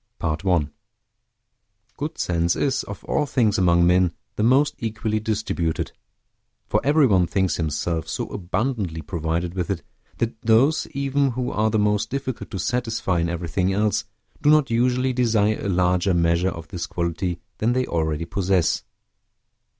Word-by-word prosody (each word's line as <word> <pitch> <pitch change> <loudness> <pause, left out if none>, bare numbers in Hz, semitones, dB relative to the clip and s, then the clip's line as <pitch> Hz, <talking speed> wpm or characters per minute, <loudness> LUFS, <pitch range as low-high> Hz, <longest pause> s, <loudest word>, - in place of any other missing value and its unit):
PART 80 +2 -2
I 90 -6 +2 1.3
Good 150 +2 -5
sense 85 0 +1
is, 135 -2 0
of 100 -2 -8
all 150 - 0
things 115 -7 +2
among 85 -1 +4
men, 90 -1 +3 0.2
the - - -2
most 130 +6 +4
equally 110 -1 -2
distributed; 105 -7 -2 0.7
for - - +1
every 145 +2 +4
one 95 -7 +3
thinks 95 -1 0
himself 80 +1 -2
so - - -3
abundantly 95 -3 -2
provided 85 +2 -2
with 90 -3 -3
it, 90 -6 -2 0.3
that 115 -1 -2
those 120 +8 +3
even 140 -1 +1
who 125 +1 -2
are 110 +1 +1
the 110 - +1
most 105 0 +1
difficult 130 -2 -4
to 100 - -5
satisfy 115 -4 -1
in 85 0 0
everything 85 +2 -1
else, 105 +2 +1 0.4
do 145 - +3
not 150 -4 +4
usually 125 +2 +2
desire 110 -4 +2
a 100 - -2
larger 90 0 +2
measure 85 +2 +2
of 85 -2 -8
this 85 -2 -4
quality 85 0 -2 0.2
than 115 +3 +2
they 130 0 +1
already 80 -1 -1
possess. 90 -1 +1
100 Hz, 155 wpm, -23 LUFS, 85-120 Hz, 1.3 s, among